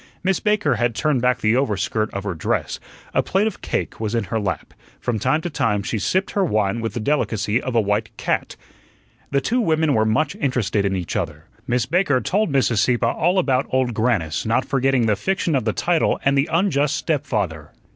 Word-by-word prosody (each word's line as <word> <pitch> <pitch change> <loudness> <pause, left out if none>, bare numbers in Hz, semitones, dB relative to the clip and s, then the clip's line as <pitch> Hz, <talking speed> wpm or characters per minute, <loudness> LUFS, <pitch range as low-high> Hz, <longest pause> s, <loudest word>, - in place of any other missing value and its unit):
Miss 190 0 +1
Baker 210 - +1
had 120 0 0
turned 135 +2 +1
back 125 -1 +1
the 110 +2 +3
overskirt 110 -3 0
of 100 - -5
her 100 -3 -2
dress; 80 - -2 0.3
a - - +3
plate 195 +3 +1
of 220 - -3
cake - - -3
was 110 +1 -2
in 115 - +1
her 110 +3 -2
lap; 100 -3 -3 0.3
from 120 -3 -2
time 130 +8 +1
to 175 - -3
time 105 -8 0
she 110 - -2
sipped 185 - 0
her 200 - +1
wine 110 - 0
with 115 -2 -4
the - - -1
delicacy 110 -3 0
of 130 -2 -4
a - - +5
white 105 +1 0
cat. - - -2 0.7
The 140 -1 +1
two 245 - +1
women 160 -5 +2
were 110 - +3
much 115 +7 +1
interested 115 -7 0
in 95 -1 0
each 90 -3 -4
other. - - -3 0.2
Miss 120 -1 +1
Baker 150 -2 +2
told 195 - 0
Mrs. 130 -4 +2
Sieppe 120 +2 +2
all 175 +10 +1
about 135 -7 +2
Old 130 -2 +1
Grannis, 105 -9 0
not 115 +4 +1
forgetting 135 -3 +1
the 105 -2 +2
fiction 190 - -1
of 130 - 0
the 110 - +2
title 170 +7 +1
and 140 0 +3
the 140 +1 +1
unjust 160 -4 +2
stepfather. 105 - -2
125 Hz, 205 wpm, -21 LUFS, 110-150 Hz, 0.7 s, a